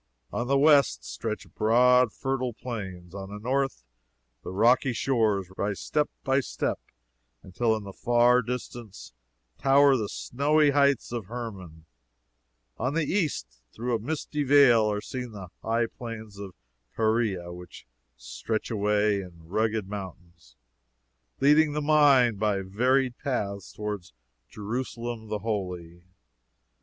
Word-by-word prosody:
On 120 Hz, -, -2 dB
the 140 Hz, +1 st, +3 dB
west, 145 Hz, -1 st, +4 dB
stretch 110 Hz, -2 st, -5 dB
broad 125 Hz, +2 st, +4 dB
fertile 130 Hz, -1 st, -2 dB
plains; 95 Hz, -7 st, -7 dB
on 100 Hz, -1 st, -7 dB
the 105 Hz, -, -7 dB
north 130 Hz, -, -1 dB, 0.6 s
the -, -, -6 dB
rocky 120 Hz, +6 st, +3 dB
shores 110 Hz, -7 st, 0 dB
rise 100 Hz, -1 st, -2 dB
step 150 Hz, -1 st, 0 dB
by 135 Hz, 0 st, +2 dB
step 135 Hz, -, -2 dB, 0.6 s
until 110 Hz, +5 st, 0 dB
in 110 Hz, -, -5 dB
the 100 Hz, -1 st, -9 dB
far 120 Hz, +2 st, +3 dB
distance 120 Hz, -, -7 dB, 0.5 s
tower 140 Hz, 0 st, +5 dB
the 110 Hz, -5 st, -2 dB
snowy 145 Hz, +3 st, +2 dB
heights 140 Hz, -3 st, +2 dB
of 115 Hz, -6 st, -4 dB
Hermon; 95 Hz, -9 st, -8 dB, 0.9 s
on 130 Hz, +5 st, -1 dB
the 165 Hz, -2 st, +1 dB
east 135 Hz, -, -2 dB
through 120 Hz, +2 st, -3 dB
a -, -, -1 dB
misty 150 Hz, +4 st, -3 dB
veil 125 Hz, -6 st, +5 dB
are 105 Hz, 0 st, -2 dB
seen 125 Hz, -1 st, -6 dB
the 95 Hz, -4 st, -9 dB
high 115 Hz, +1 st, +1 dB
plains 110 Hz, -3 st, -9 dB
of 100 Hz, -3 st, -8 dB, 0.4 s
Perea, 110 Hz, -6 st, 0 dB
which 90 Hz, 0 st, -12 dB, 0.3 s
stretch 60 Hz, -, -4 dB
away 105 Hz, -1 st, +1 dB
in 85 Hz, -3 st, -13 dB
rugged 110 Hz, +2 st, 0 dB
mountains 90 Hz, -4 st, -9 dB, 0.8 s
leading 150 Hz, +2 st, +4 dB
the 150 Hz, -, -1 dB
mind 145 Hz, -7 st, +4 dB
by 105 Hz, -2 st, +1 dB
varied 125 Hz, +6 st, +1 dB
paths 100 Hz, -, -3 dB
toward 105 Hz, -4 st, -5 dB, 0.4 s
Jerusalem 115 Hz, +1 st, -5 dB
the 105 Hz, 0 st, -2 dB
Holy. 90 Hz, -5 st, -4 dB
115 Hz, 130 wpm, -27 LUFS, 100-130 Hz, 0.9 s, tower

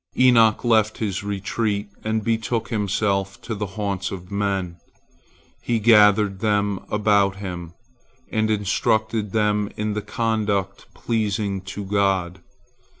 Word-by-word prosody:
Enoch 115 Hz, -4 st, +5 dB
left 110 Hz, -2 st, +2 dB
his 100 Hz, -3 st, -3 dB
retreat 100 Hz, +1 st, -2 dB, 0.2 s
and 110 Hz, 0 st, -1 dB
betook 115 Hz, 0 st, -1 dB
himself 100 Hz, -2 st, -1 dB
to 115 Hz, -, -5 dB
the 105 Hz, -1 st, -3 dB
haunts 100 Hz, -2 st, -2 dB
of 90 Hz, -1 st, -8 dB
men. 100 Hz, -4 st, -2 dB, 0.8 s
He 120 Hz, -, 0 dB
gathered 105 Hz, -3 st, +5 dB
them 105 Hz, -2 st, +1 dB
about 100 Hz, -2 st, +2 dB
him, 90 Hz, -4 st, -7 dB, 0.6 s
and 110 Hz, 0 st, +1 dB
instructed 110 Hz, +1 st, 0 dB
them 105 Hz, -1 st, +1 dB
in 105 Hz, 0 st, -1 dB
the 105 Hz, -, -2 dB
conduct 105 Hz, -4 st, -2 dB
pleasing 105 Hz, -3 st, -1 dB, 0.2 s
to 100 Hz, -, -4 dB
God. 95 Hz, -3 st, 0 dB
105 Hz, 120 wpm, -22 LUFS, 100-110 Hz, 0.8 s, Enoch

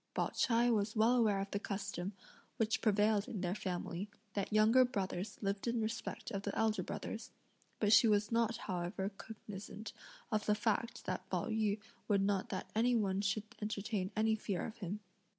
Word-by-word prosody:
Pao -, -, +1 dB
ch'ai 240 Hz, 0 st, +3 dB
was 210 Hz, 0 st, +1 dB
well 225 Hz, +3 st, +5 dB
aware 215 Hz, -5 st, +3 dB
of 195 Hz, 0 st, -3 dB
the 200 Hz, -, 0 dB
custom, 195 Hz, -2 st, -3 dB, 0.4 s
which 225 Hz, +2 st, +1 dB
prevailed 210 Hz, -1 st, +3 dB
in 205 Hz, -, -4 dB
their 180 Hz, -1 st, 0 dB
family, 185 Hz, -1 st, -3 dB, 0.2 s
that 200 Hz, 0 st, -2 dB
younger 220 Hz, +4 st, +6 dB
brothers 200 Hz, -5 st, -2 dB
lived 200 Hz, +3 st, -1 dB
in 235 Hz, 0 st, +1 dB
respect 225 Hz, +2 st, -3 dB
of 195 Hz, -, -2 dB
the 200 Hz, 0 st, -3 dB
elder 220 Hz, -1 st, +2 dB
brothers, -, -, -5 dB, 0.5 s
but 210 Hz, 0 st, +4 dB
she 230 Hz, -, +8 dB
was 210 Hz, 0 st, +3 dB
not 230 Hz, 0 st, +2 dB
however 185 Hz, +1 st, -3 dB
cognisant 210 Hz, 0 st, -8 dB, 0.4 s
of 215 Hz, -1 st, 0 dB
the 210 Hz, -, +4 dB
fact 220 Hz, +1 st, -1 dB
that -, -, -3 dB
Pao -, -, -1 dB
yü 215 Hz, -2 st, +1 dB, 0.3 s
would 200 Hz, -2 st, +3 dB
not 195 Hz, -1 st, +1 dB
that 185 Hz, -, -4 dB
any 240 Hz, +3 st, +3 dB
one 200 Hz, -3 st, +1 dB
should 205 Hz, +1 st, 0 dB, 0.2 s
entertain 210 Hz, -2 st, -2 dB
any 220 Hz, 0 st, +3 dB
fear 200 Hz, -4 st, -2 dB
of 225 Hz, -, -7 dB
him. 200 Hz, +1 st, -4 dB
210 Hz, 180 wpm, -36 LUFS, 195-225 Hz, 0.5 s, she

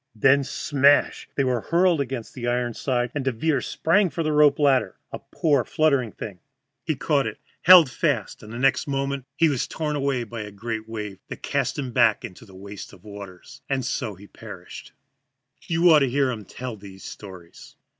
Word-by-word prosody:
Then 135 Hz, +5 st, +4 dB
smash 140 Hz, +1 st, +2 dB
they 140 Hz, -, +1 dB
were 125 Hz, -3 st, 0 dB
hurled 170 Hz, +1 st, +2 dB
against 130 Hz, -4 st, -5 dB
the 120 Hz, -2 st, -5 dB
iron 120 Hz, 0 st, 0 dB
side, 120 Hz, 0 st, -1 dB
and 145 Hz, -, -2 dB
Devere 130 Hz, +2 st, 0 dB
sprang 185 Hz, +9 st, +1 dB
for 165 Hz, +3 st, -3 dB
the 155 Hz, -, 0 dB
rope 150 Hz, -1 st, +5 dB
ladder 140 Hz, -3 st, +2 dB, 0.2 s
a -, -, -6 dB
poor, 145 Hz, -6 st, 0 dB
fluttering 140 Hz, -7 st, +1 dB
thing. 100 Hz, -3 st, -8 dB, 0.4 s
He -, -, -1 dB
caught -, -, +1 dB
it, -, -, -6 dB, 0.2 s
held 180 Hz, -3 st, +9 dB
fast, 130 Hz, -, -2 dB
and 105 Hz, -, -11 dB
the 115 Hz, -, -6 dB
next 135 Hz, +3 st, +2 dB
moment 140 Hz, -1 st, -2 dB
was 150 Hz, -6 st, +2 dB
torn 150 Hz, -2 st, -3 dB
away 135 Hz, -3 st, 0 dB
by 115 Hz, 0 st, -7 dB
a 105 Hz, -, -7 dB
great 110 Hz, +2 st, -6 dB
wave 105 Hz, -3 st, -6 dB
that -, -, -9 dB
cast -, -, -1 dB
him 135 Hz, -3 st, -3 dB
back 115 Hz, -3 st, +3 dB
into 90 Hz, +5 st, -11 dB
the 95 Hz, -, -15 dB
waste 100 Hz, +1 st, -9 dB
of 90 Hz, -, -17 dB
waters. 100 Hz, +4 st, -11 dB
And 135 Hz, -3 st, -1 dB
so 115 Hz, -3 st, -3 dB
he 100 Hz, +3 st, -14 dB
perished. 100 Hz, -4 st, -11 dB, 0.8 s
You 165 Hz, +1 st, +2 dB
ought 155 Hz, -, +7 dB
to 135 Hz, -2 st, +1 dB
hear 135 Hz, +1 st, +1 dB
them 110 Hz, -5 st, -5 dB
tell 125 Hz, +2 st, -7 dB
these 95 Hz, -1 st, -12 dB
stories! 90 Hz, -4 st, -11 dB
130 Hz, 190 wpm, -24 LUFS, 110-145 Hz, 0.8 s, held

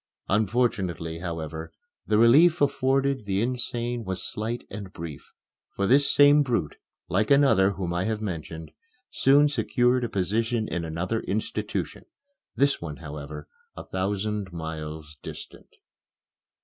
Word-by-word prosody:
Unfortunately, 95 Hz, -6 st, 0 dB
however, 80 Hz, -2 st, -5 dB, 0.4 s
the 105 Hz, -, +3 dB
relief 155 Hz, +10 st, +6 dB
afforded 135 Hz, -3 st, +1 dB
the 95 Hz, -1 st, 0 dB
insane 120 Hz, -1 st, -2 dB
was 95 Hz, 0 st, -4 dB
slight 115 Hz, +3 st, -4 dB
and 100 Hz, -2 st, -7 dB
brief, 80 Hz, -5 st, -9 dB, 0.4 s
for 100 Hz, -, 0 dB
this 140 Hz, +5 st, +4 dB
same 145 Hz, +1 st, +6 dB
brute, 120 Hz, -, -1 dB, 0.3 s
like 105 Hz, +3 st, +1 dB
another 135 Hz, -9 st, +5 dB
whom 90 Hz, -2 st, -3 dB
I 90 Hz, +2 st, -1 dB
have 110 Hz, -1 st, -1 dB
mentioned, 85 Hz, -5 st, -6 dB, 0.4 s
soon 140 Hz, +2 st, +5 dB
secured 125 Hz, -1 st, +1 dB
a 120 Hz, -, -1 dB
position 110 Hz, +3 st, 0 dB
in 85 Hz, 0 st, -3 dB
another 85 Hz, +7 st, -2 dB
institution 105 Hz, +1 st, -3 dB, 0.5 s
this 140 Hz, 0 st, +2 dB
one, 75 Hz, -3 st, -6 dB
however, 75 Hz, -1 st, -8 dB, 0.3 s
a -, -, -6 dB
thousand 100 Hz, +1 st, -2 dB
miles 80 Hz, -2 st, -6 dB
distant. -, -, -10 dB
105 Hz, 125 wpm, -26 LUFS, 85-120 Hz, 0.5 s, relief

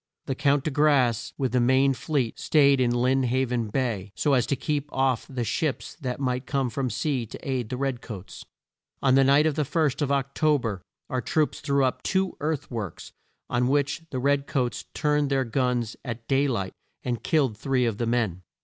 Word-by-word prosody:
The -, -, -1 dB
Count 140 Hz, +1 st, +2 dB
de 155 Hz, -, -1 dB
Grasse, 130 Hz, -6 st, +2 dB
with 130 Hz, -3 st, 0 dB
the 125 Hz, -, +2 dB
main 130 Hz, +3 st, +4 dB
fleet, 130 Hz, -4 st, -2 dB
staid 140 Hz, -3 st, +4 dB
in 125 Hz, -, +3 dB
Lynn 125 Hz, +2 st, +2 dB
Haven 125 Hz, -2 st, 0 dB
Bay 105 Hz, -4 st, -2 dB
so 145 Hz, -, +1 dB
as 125 Hz, -3 st, +3 dB
to 140 Hz, -, +1 dB
keep 145 Hz, +2 st, -2 dB
off 130 Hz, -3 st, +1 dB
the 130 Hz, -3 st, -3 dB
ships 145 Hz, +5 st, -2 dB
that 125 Hz, -2 st, -3 dB
might 130 Hz, -1 st, -1 dB
come 135 Hz, -4 st, 0 dB
from 130 Hz, +2 st, -1 dB
sea 125 Hz, +1 st, -1 dB
to -, -, -8 dB
aid 125 Hz, -4 st, -1 dB
the 125 Hz, -, -3 dB
red 135 Hz, -2 st, -2 dB
coats. 100 Hz, -4 st, -9 dB, 0.6 s
On 130 Hz, -2 st, +4 dB
the 135 Hz, +1 st, +6 dB
night 140 Hz, +3 st, +5 dB
of 155 Hz, -, +2 dB
the 150 Hz, -, 0 dB
first 150 Hz, 0 st, 0 dB
of 140 Hz, -1 st, 0 dB
Oc 140 Hz, -1 st, 0 dB
to 155 Hz, -1 st, +3 dB
ber 110 Hz, -8 st, -4 dB, 0.3 s
our 130 Hz, -3 st, -2 dB
troops 155 Hz, +2 st, 0 dB
threw 140 Hz, -2 st, +2 dB
up 130 Hz, -, -1 dB
two 190 Hz, -1 st, 0 dB
earth 150 Hz, -2 st, -2 dB
works, 110 Hz, -7 st, -5 dB, 0.4 s
on 125 Hz, 0 st, +1 dB
which 140 Hz, +3 st, +1 dB
the 130 Hz, -, -4 dB
red 140 Hz, +2 st, +1 dB
coats 125 Hz, -5 st, -1 dB
turned 150 Hz, -2 st, +1 dB
their 135 Hz, -1 st, +1 dB
guns 120 Hz, -2 st, 0 dB
at 115 Hz, -2 st, -6 dB
day 140 Hz, +1 st, +3 dB
light 100 Hz, -8 st, -2 dB, 0.3 s
and 120 Hz, -2 st, -2 dB
killed 140 Hz, -8 st, +1 dB
three 130 Hz, +2 st, 0 dB
of 110 Hz, -3 st, -2 dB
the 120 Hz, -, 0 dB
men. 115 Hz, -7 st, 0 dB
130 Hz, 205 wpm, -26 LUFS, 120-140 Hz, 0.6 s, the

